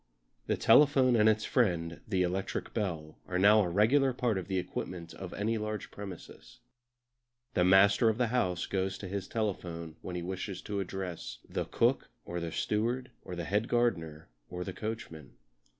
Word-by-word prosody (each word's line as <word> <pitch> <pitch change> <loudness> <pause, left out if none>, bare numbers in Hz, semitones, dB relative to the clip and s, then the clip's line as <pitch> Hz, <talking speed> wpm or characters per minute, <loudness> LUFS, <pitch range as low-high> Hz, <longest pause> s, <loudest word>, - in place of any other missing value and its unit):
The - - +1
telephone 135 -4 +5
and 110 -1 +5
its 110 0 +1
friend, 85 -9 0
the 95 -3 +1
electric 90 +2 -3
bell, 85 -8 -3
are 90 - -1
now 105 +3 +6
a 90 - 0
regular 125 +9 +3
part 120 -5 0
of 90 - -7
the 95 -1 -1
equipment 90 -1 -5
of 95 -2 -8
any 110 +2 -1
large 105 -1 -4
premises. 100 -4 -10 1.0
The 90 - +3
master 100 +4 +6
of 110 - 0
the 120 -2 +1
house 90 -8 +1
goes 95 0 -1
to 95 - -7
his 95 0 -4
telephone 85 -7 -3
when 90 - -6
he 90 - -3
wishes 95 +2 -5
to 100 -2 -3
address 90 -10 -5
the - - -2
cook - - +1 0.2
or 85 0 -4
the 85 -1 -4
steward, 120 +8 -1
or 90 - -7
the 85 -1 -4
head 105 +5 0
gardener 85 -11 0 0.2
or 90 0 -4
the 95 - -5
coachman. 110 -8 -6
95 Hz, 175 wpm, -31 LUFS, 90-110 Hz, 1.0 s, now